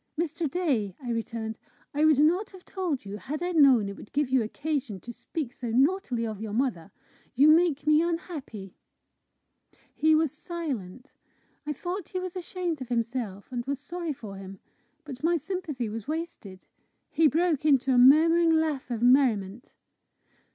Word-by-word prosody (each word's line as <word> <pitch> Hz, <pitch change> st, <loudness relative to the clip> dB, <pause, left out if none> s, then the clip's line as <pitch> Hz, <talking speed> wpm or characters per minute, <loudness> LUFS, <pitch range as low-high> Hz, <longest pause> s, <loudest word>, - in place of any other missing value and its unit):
"Mr. 330 Hz, -1 st, -1 dB
Day," 260 Hz, -, -1 dB
I 245 Hz, -3 st, -5 dB
returned, 225 Hz, -1 st, -4 dB, 0.3 s
"I 295 Hz, +2 st, +2 dB
would 310 Hz, -3 st, +5 dB
not 340 Hz, +8 st, +3 dB
have 375 Hz, -2 st, -15 dB
told 345 Hz, -, -3 dB
you, 200 Hz, +1 st, -6 dB
had 295 Hz, +9 st, -5 dB
I 355 Hz, -, -1 dB
known 270 Hz, -, +5 dB
it 200 Hz, -, -6 dB
would -, -, -13 dB
give 290 Hz, -2 st, 0 dB
you 260 Hz, -2 st, +4 dB
occasion 265 Hz, -2 st, -3 dB
to 240 Hz, +6 st, -9 dB
speak 275 Hz, 0 st, -5 dB
so 245 Hz, -3 st, -6 dB
naughtily 260 Hz, -1 st, +1 dB
of 215 Hz, -2 st, -5 dB
your 215 Hz, -2 st, -5 dB
mother. 215 Hz, -7 st, -1 dB, 0.4 s
You 285 Hz, +5 st, +6 dB
make 320 Hz, -2 st, +4 dB
me 305 Hz, +1 st, +5 dB
unhappy." 310 Hz, -, -4 dB, 1.2 s
He 315 Hz, 0 st, +3 dB
was 315 Hz, -3 st, +2 dB
silent. 285 Hz, -, -6 dB, 0.5 s
I 300 Hz, -, -1 dB
thought 355 Hz, +5 st, -5 dB
he 370 Hz, -, -3 dB
was 365 Hz, 0 st, -6 dB
ashamed 355 Hz, -4 st, -4 dB
of 255 Hz, -, -6 dB
himself, 230 Hz, -4 st, -3 dB
and 245 Hz, -1 st, -3 dB
was 280 Hz, -1 st, -2 dB
sorry 340 Hz, +3 st, -5 dB
for 210 Hz, -7 st, -9 dB
him. 195 Hz, 0 st, -9 dB, 0.5 s
But 275 Hz, -3 st, -9 dB
my 340 Hz, +1 st, +3 dB
sympathy 315 Hz, -, -4 dB
was 215 Hz, 0 st, -6 dB
wasted. 305 Hz, -, -6 dB, 0.5 s
He 320 Hz, -1 st, +4 dB
broke 320 Hz, -1 st, +1 dB
into 270 Hz, -3 st, +3 dB
a 245 Hz, -, +5 dB
murmuring 325 Hz, +6 st, +6 dB
laugh 300 Hz, -5 st, -2 dB
of 235 Hz, -1 st, -3 dB
merriment. 245 Hz, -4 st, +2 dB
280 Hz, 165 wpm, -27 LUFS, 230-325 Hz, 1.2 s, You